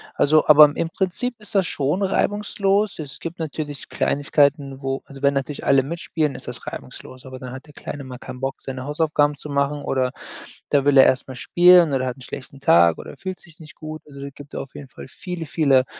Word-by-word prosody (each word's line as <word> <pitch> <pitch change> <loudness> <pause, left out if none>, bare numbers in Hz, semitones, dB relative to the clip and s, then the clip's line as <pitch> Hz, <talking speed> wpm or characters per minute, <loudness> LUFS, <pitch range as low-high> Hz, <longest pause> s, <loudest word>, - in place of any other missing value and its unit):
Also, 155 +1 +4
aber 150 0 +10
im 165 - -1
Prinzip 200 +8 -2
ist 210 -1 -9
das 190 -2 +4
schon 150 +8 -1
reibungslos. 205 0 0
Es 145 -3 -7
gibt 165 0 -7
natürlich 150 -2 -5
Kleinigkeiten, 140 -1 +1
wo 135 0 -3
also, 140 0 -12
wenn 140 0 +3
natürlich 140 +1 -3
alle 135 -1 +4
mitspielen, 155 -1 -2
ist - - -10
das - - -6
reibungslos. 130 +1 -9
Aber 130 -1 -9
dann 125 -1 -8
hat 130 +3 -9
der 150 - -16
Kleine 140 0 -7
mal 125 -1 -9
keinen 130 -1 -9
Bock, 135 0 -3
seine 130 -1 -6
Hausaufgaben 150 -1 +1
zu 150 - -9
machen 140 +1 -1
oder 130 -1 0 0.6
da 140 -2 +3
will 145 -1 +4
er 135 - +9
erst 130 0 +2
mal 130 - -7
spielen 175 +1 +5
oder 130 -1 0
hat 125 - -4
'n 130 - -15
schlechten 135 +3 -9
Tag 85 -8 +5
oder - - -9
fühlt 185 -1 -6
sich 170 0 -17
nicht 155 - -13
gut. 155 0 -8
Also, 140 -1 -12
da 140 - -5
gibt 145 +1 -14
auf 135 - -7
jeden 140 -3 -9
Fall 120 - -11
viele, 180 +1 -6
viele 140 -4 +3
145 Hz, 220 wpm, -22 LUFS, 135-160 Hz, 0.6 s, aber